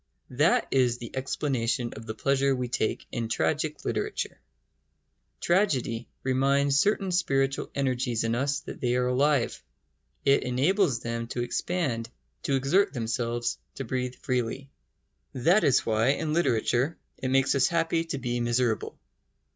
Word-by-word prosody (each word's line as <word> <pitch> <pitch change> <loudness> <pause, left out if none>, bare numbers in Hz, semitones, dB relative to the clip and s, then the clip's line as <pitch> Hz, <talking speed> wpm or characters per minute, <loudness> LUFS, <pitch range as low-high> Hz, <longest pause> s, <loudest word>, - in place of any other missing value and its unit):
That 145 +6 +3
is 125 -3 +3
the 120 0 -9
explanation 130 -3 -1
of 110 +1 -10
the 110 - -4
pleasure 140 +2 +2
we 125 -1 -3
take 110 - -1
in 115 -3 -3
tragic 155 +4 -1
literature. - - -2 1.0
Tragedy 135 - +1
reminds 140 +2 +2
certain 200 0 +1
spiritual 135 -6 +1
energies 125 -4 0
in 115 0 0
us 135 +3 0
that - - -9
they 125 -1 +1
are 125 0 +1
alive. 135 +1 +1 0.6
It 140 0 +5
enables 135 - +1
them 115 0 -3
to 120 +1 -3
expand, 120 -4 -2 0.3
to 135 - 0
exert 140 +10 +2
themselves, 120 0 -2 0.2
to - - -4
breathe 125 0 -3
freely. 130 +2 -3 0.6
That 170 - +3
is 140 - +3
why, 110 +1 +2
in 155 +1 -2
literature, 130 -1 +1 0.2
it 130 - -2
makes 135 +1 +3
us 135 -2 +3
happy 165 0 +1
to 165 -4 -3
be 120 -2 -2
miserable. 120 -2 0
130 Hz, 140 wpm, -27 LUFS, 120-140 Hz, 1.0 s, It